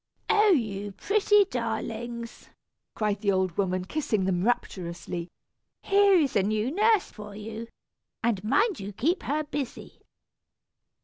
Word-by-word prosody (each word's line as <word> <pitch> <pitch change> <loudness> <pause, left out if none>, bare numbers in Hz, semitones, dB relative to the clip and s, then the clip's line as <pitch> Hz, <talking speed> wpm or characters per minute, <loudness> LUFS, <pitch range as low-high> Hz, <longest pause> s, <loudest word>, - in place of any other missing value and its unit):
"Oh! 425 0 +5
you 205 - 0
pretty 415 - +3
darlings!" 235 - -4 0.5
cried 210 -2 -1
the 200 -2 +2
old 185 -3 0
woman, 185 -2 0
kissing 215 -5 -1
them 180 -1 0
rapturously, 175 -6 -2 0.5
"here 400 0 +5
is 300 -7 +2
a 200 - +5
new 215 +5 0
nurse 425 +3 +3
for 210 -1 -10
you; 220 +2 -7 0.6
and 220 -5 0
mind 400 - +2
you 200 +1 -6
keep 320 - 0
her 300 +2 -1
busy." 290 -3 -6
225 Hz, 130 wpm, -27 LUFS, 200-310 Hz, 0.6 s, Oh